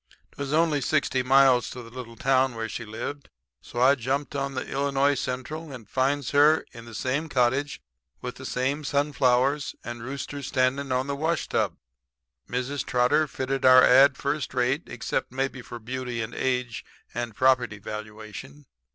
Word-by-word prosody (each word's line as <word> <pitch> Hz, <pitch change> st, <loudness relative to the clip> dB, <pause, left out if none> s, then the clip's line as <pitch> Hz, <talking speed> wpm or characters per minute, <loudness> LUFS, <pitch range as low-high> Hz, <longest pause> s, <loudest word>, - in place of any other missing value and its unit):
"'Twas 140 Hz, -1 st, -5 dB
only 155 Hz, -2 st, +2 dB
sixty 140 Hz, -2 st, +1 dB
miles 130 Hz, -1 st, +4 dB
to 125 Hz, -, -8 dB
the 115 Hz, -, -13 dB
little 120 Hz, -2 st, -8 dB
town 130 Hz, +1 st, +2 dB
where 115 Hz, 0 st, -3 dB
she 120 Hz, -, -5 dB
lived, 130 Hz, +6 st, -6 dB, 0.3 s
so 120 Hz, -, -7 dB
I 130 Hz, +3 st, +6 dB
jumped 140 Hz, +3 st, -2 dB
out 140 Hz, -, -1 dB
on 140 Hz, -, -6 dB
the 130 Hz, -, -3 dB, 0.3 s
I. 140 Hz, +1 st, +4 dB
C. 130 Hz, -, -3 dB
and 130 Hz, -1 st, -6 dB
finds 135 Hz, 0 st, 0 dB
her 150 Hz, +2 st, +5 dB
in 115 Hz, 0 st, -11 dB
the 115 Hz, -1 st, -10 dB
same 135 Hz, +8 st, -1 dB
cottage 130 Hz, -, 0 dB, 0.4 s
with -, -, -6 dB
the -, -, -9 dB
same 135 Hz, +4 st, -1 dB
sunflowers 140 Hz, -1 st, +1 dB
and 120 Hz, -1 st, -6 dB
roosters 140 Hz, +2 st, -5 dB
standing 130 Hz, +1 st, 0 dB
on 130 Hz, +1 st, +1 dB
the 140 Hz, 0 st, -2 dB
washtub. 160 Hz, +3 st, -1 dB, 0.7 s
Mrs. 125 Hz, +3 st, -2 dB
Trotter 125 Hz, +5 st, +2 dB
fitted 135 Hz, 0 st, -3 dB
our 130 Hz, 0 st, +8 dB
ad 135 Hz, +1 st, +6 dB
first 140 Hz, -2 st, -2 dB
rate 130 Hz, +6 st, +1 dB
except, -, -, -3 dB
maybe 135 Hz, 0 st, -2 dB
for 120 Hz, -, -8 dB
beauty 120 Hz, 0 st, -4 dB
and 115 Hz, +2 st, -7 dB
age 125 Hz, -2 st, -1 dB, 0.3 s
and 120 Hz, -2 st, -4 dB
property 125 Hz, -4 st, +2 dB
valuation. 110 Hz, +7 st, -8 dB
130 Hz, 165 wpm, -26 LUFS, 125-140 Hz, 0.7 s, our